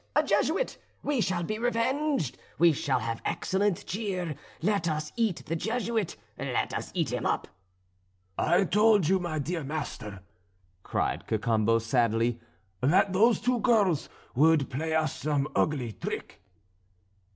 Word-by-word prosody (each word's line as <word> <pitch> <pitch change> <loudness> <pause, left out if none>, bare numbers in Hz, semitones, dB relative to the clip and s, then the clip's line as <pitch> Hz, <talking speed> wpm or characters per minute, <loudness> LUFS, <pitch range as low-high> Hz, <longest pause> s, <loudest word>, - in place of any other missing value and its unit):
a - - +5
Jesuit! - - +1 0.2
we 285 -5 +1
shall 185 -4 0
be 215 +5 -3
revenged, 245 - 0 0.2
we 170 -1 +6
shall 135 -2 0
have 115 -1 -3
excellent 195 -1 0
cheer, 185 -6 -2 0.3
let 200 -3 +1
us 155 -1 -3
eat 225 -7 0
the 165 - -2
Jesuit, 225 +1 -1 0.2
let - - -1
us - - -3
eat - - 0
him - - -2
up!" - - -1 0.9
"I 175 - +3
told 210 -2 +4
you, 190 +2 +3
my 170 -3 -3
dear 160 +3 -2
master," 135 -9 -5 0.6
cried - - -2
Cacambo 110 0 +2
sadly, 115 0 +1 0.4
"that 180 +7 +3
those 225 +5 +4
two 250 -1 +1
girls 205 - +2 0.2
would 150 +1 +4
play 160 +4 -1
us 155 0 +1
some 145 -2 0
ugly 135 -7 +1
trick." - - -6
165 Hz, 140 wpm, -28 LUFS, 140-210 Hz, 0.9 s, we